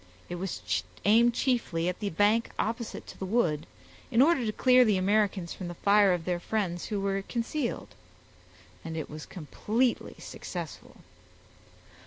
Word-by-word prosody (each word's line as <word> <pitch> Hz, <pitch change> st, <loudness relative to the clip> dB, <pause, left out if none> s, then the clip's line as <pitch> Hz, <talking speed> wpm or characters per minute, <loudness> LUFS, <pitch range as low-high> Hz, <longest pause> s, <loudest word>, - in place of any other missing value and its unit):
It 175 Hz, -, -4 dB
was 100 Hz, -, -2 dB, 0.2 s
aimed 230 Hz, +3 st, +5 dB
chiefly 230 Hz, -12 st, 0 dB
at 180 Hz, -, -2 dB
the 205 Hz, -, -2 dB
bank 205 Hz, +6 st, +2 dB
opposite 230 Hz, +1 st, -3 dB
to -, -, -12 dB
the 190 Hz, -, -3 dB
wood, 175 Hz, -9 st, +1 dB, 0.4 s
in 230 Hz, -, +1 dB
order 285 Hz, -1 st, +5 dB
to -, -, +1 dB
clear 255 Hz, +3 st, +5 dB
the 215 Hz, -5 st, +3 dB
Americans 195 Hz, -2 st, +1 dB
from 185 Hz, -, -6 dB
the 175 Hz, -, -6 dB
fire 200 Hz, +1 st, +4 dB
of 175 Hz, -2 st, -1 dB
their 180 Hz, -1 st, -1 dB
friends 175 Hz, -3 st, -2 dB
who 210 Hz, -, -2 dB
were 195 Hz, 0 st, 0 dB
concealed; 235 Hz, +5 st, -3 dB, 0.9 s
and 165 Hz, 0 st, -5 dB
it 155 Hz, -, -5 dB
was 155 Hz, 0 st, -8 dB
completely 220 Hz, -, -1 dB
successful. -, -, -8 dB
200 Hz, 155 wpm, -29 LUFS, 175-230 Hz, 0.9 s, aimed